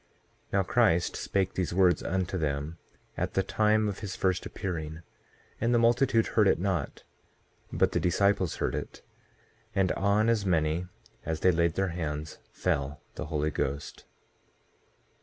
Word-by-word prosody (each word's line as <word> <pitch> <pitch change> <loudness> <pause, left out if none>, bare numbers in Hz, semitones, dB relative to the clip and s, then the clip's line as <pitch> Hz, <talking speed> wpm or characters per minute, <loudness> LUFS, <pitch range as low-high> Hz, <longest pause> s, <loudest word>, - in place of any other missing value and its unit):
2:3 - - -28
Now 100 -1 +3
Christ 95 -5 +2
spake 95 -2 -1
these 90 -2 -2
words 90 -3 +4
unto 95 0 -2
them 75 0 -2 0.4
at - - -3
the 95 - +3
time 110 +2 +2
of 100 - -4
his 100 -3 -5
first 95 -1 0
appearing; 80 -3 -5 0.6
and 120 +2 +2
the - - +5
multitude 120 0 +3
heard 110 -3 +3
it 95 - +4
not, 90 -5 -2 0.7
but - - +2
the - - +1
disciples 95 0 +2
heard - - -1
it; - - -6 0.7
and 95 -2 +2
on 100 +3 +2
as 115 -3 +2
many 85 -1 +1 0.4
as 80 -1 -3
they 95 - +5
laid 85 0 +1
their 95 -1 +1
hands, 75 -3 -4
fell 70 +1 -1
the - - -6
Holy 75 0 -1
Ghost. 70 +1 -4
90 Hz, 155 wpm, -29 LUFS, 80-100 Hz, 0.7 s, the